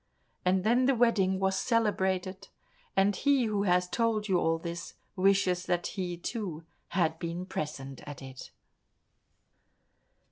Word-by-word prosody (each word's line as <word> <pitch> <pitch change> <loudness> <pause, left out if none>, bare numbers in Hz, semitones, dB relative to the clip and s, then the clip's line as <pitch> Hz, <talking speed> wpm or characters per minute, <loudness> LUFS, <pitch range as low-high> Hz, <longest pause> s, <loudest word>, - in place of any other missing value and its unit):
And 185 0 +2
then 245 +4 +3
the 275 - +4
wedding 205 -6 +3
was 190 0 +1
celebrated, 190 -4 0 0.5
and 195 +1 +4
he 275 +2 +3
who 205 -2 0
has 180 -1 +3
told 220 +1 0
you 185 -3 +3
all 165 0 +2
this, 170 +1 -6 0.2
wishes 185 -1 +2
that 175 -1 0
he, 180 -3 -3
too, 175 -4 -4 0.2
had 160 -3 0
been 170 +2 -4
present 140 -6 -5
at 145 -2 -7
it. 130 -1 -10
190 Hz, 135 wpm, -30 LUFS, 175-210 Hz, 0.5 s, the